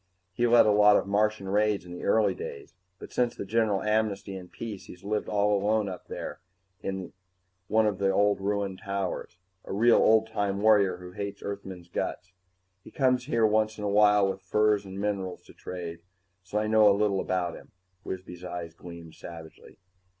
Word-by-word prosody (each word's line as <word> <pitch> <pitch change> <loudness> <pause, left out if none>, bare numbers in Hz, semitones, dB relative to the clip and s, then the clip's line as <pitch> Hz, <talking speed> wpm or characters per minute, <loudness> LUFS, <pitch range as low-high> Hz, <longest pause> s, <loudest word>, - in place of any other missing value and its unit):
He 120 +5 +1
led 120 -1 +6
a 105 - +4
lot 105 0 +6
of - - -1
Martian 105 0 0
raids 105 -1 +1
in 90 - -11
the 90 - -7
early 105 -4 +3
days, 70 - -8 0.2
but - - -11
since 120 -1 +1
the - - -5
general 105 -1 +1
amnesty 105 -2 0
and 90 -2 -9
peace 110 -4 -7
he's 90 +1 -13
lived 105 +1 -2
all 105 0 +2
alone 105 +1 +1
up 90 -2 -7
there, - - -6 0.4
in 95 -2 -5 0.5
one 110 0 +3
of 105 -3 0
the 100 -1 +2
old 100 +1 +2
ruined 100 -1 -2
towers. 100 -3 -4 0.3
A - - -9
real 115 +4 +5
old 110 0 +5
time 100 -3 -2
warrior 100 -4 +4
who 90 0 -10
hates 100 +1 -6
Earthmen's 95 -3 -7
guts. 90 +1 -4 0.5
He - - -12
comes 125 -2 +1
here 115 -5 +2
once 110 0 +1
in 105 - -6
a 105 - 0
while 105 -1 +5
with 95 0 -4
furs 105 +2 +2
and 95 0 -7
minerals 100 -3 -3
to - - -16
trade, 85 -2 -7 0.4
so 90 +3 -5
I 105 - +1
know 110 -1 +5
a 100 - +3
little 100 -2 +1
about 90 -2 -1
him." - - -12 0.3
Wisby's 90 -1 -7
eyes 85 -2 -6
gleamed 85 -1 -11
savagely. 80 -1 -12
100 Hz, 190 wpm, -28 LUFS, 95-105 Hz, 0.5 s, led